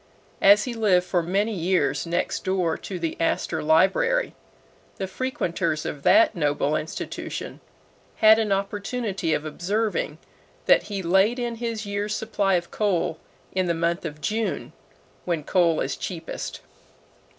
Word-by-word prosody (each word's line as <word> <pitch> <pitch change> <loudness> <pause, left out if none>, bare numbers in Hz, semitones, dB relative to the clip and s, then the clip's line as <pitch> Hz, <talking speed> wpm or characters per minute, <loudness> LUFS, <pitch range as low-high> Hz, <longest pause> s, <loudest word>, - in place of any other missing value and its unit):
As 200 +1 +7
he 250 - -4
lived 200 -6 +3
for 175 -1 +1
many 200 +6 0
years 170 -5 0
next 175 +1 -1
door 180 -4 0
to 190 - -6
the 165 -2 -3
Astor 165 - 0
Library, 195 - +3 0.6
the 190 - -3
frequenters 175 -8 -2
of 145 - -4
that 320 - +5
noble 145 -2 +1
institution 155 +1 -5 0.6
had 220 0 +6
an 215 -2 0
opportunity 200 -1 -2
of 150 - -4
observing 200 +8 -2 0.5
that - - +6
he 200 -2 -3
laid 190 +7 +3
in 240 -2 -3
his 230 -2 -3
year's 205 +1 -2
supply 205 -3 0
of 175 -1 -2
coal 180 -6 0 0.3
in 185 -1 0
the 170 - +1
month 170 +1 0
of 150 -2 -6
June, 215 +8 -2 0.5
when 170 -4 -1
coal 170 -1 +2
is 135 - -2
cheapest. 170 -3 -6
190 Hz, 140 wpm, -24 LUFS, 165-215 Hz, 0.6 s, As